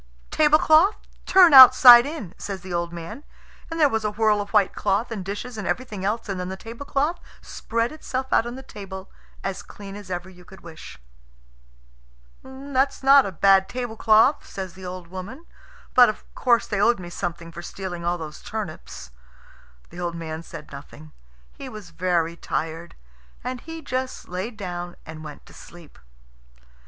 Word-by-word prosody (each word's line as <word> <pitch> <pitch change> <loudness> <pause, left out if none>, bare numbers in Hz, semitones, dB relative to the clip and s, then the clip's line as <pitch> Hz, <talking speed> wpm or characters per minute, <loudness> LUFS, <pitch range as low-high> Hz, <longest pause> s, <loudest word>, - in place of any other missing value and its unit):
"Tablecloth, 310 +5 +4 0.3
turn 365 -4 +6
outside 255 -1 +10
in!" 290 - -7
says 195 -2 -6
the 185 -1 -8
old 170 0 -2
man; 170 - -8 0.5
and 330 0 -5
there 300 - +6
was 225 -5 -2
a 210 - 0
whirl 210 0 +1
of 200 - -7
white 205 -3 +2
cloth 205 +4 -1
and 210 -4 -4
dishes 210 +4 -6
and 200 - -5
everything 215 -7 -3
else, 215 +4 -2
and 195 -2 -4
then 180 0 -4
the 190 - -6
tablecloth 280 - -3 0.2
spread 230 +1 -3
itself 265 -4 -5
out 230 - +3
on 240 - -6
the 265 - -9
table 195 -5 -10 0.3
as 195 -1 -4
clean 200 -1 -11
as 205 -2 -10
ever 180 0 -4
you 180 -1 -15
could 190 +1 -16
wish. 165 -2 -11 1.4
"That's 265 +1 -2
not 275 -2 +6
a - - -5
bad 195 +2 +4
tablecloth," 230 +2 +2
says 190 -2 -7
the 190 -1 -10
old 180 -1 -7
woman; 195 - -9 0.5
"but, 245 -2 +7
of 215 - -6
course, 240 -2 +2
they 205 -2 -2
owed 235 0 +3
me 175 -1 -9
something 170 -1 -5
for 170 0 -9
stealing 175 -1 -7
all 175 +1 0
those 155 -2 -9
turnips." 170 - -7 0.8
The 175 - -10
old 175 -1 -3
man 160 -1 -6
said 165 - -11
nothing. 145 +2 -12 0.4
He 270 - -9
was 210 -7 -11
very 170 -1 -1
tired, 165 0 -5 0.5
and 250 0 -5
he 325 0 -9
just 255 0 -4
laid 190 +6 -5
down 175 -3 -6
and 155 0 -9
went 150 -1 -11
to - - -17
sleep. 170 - -15
200 Hz, 170 wpm, -23 LUFS, 175-250 Hz, 1.4 s, outside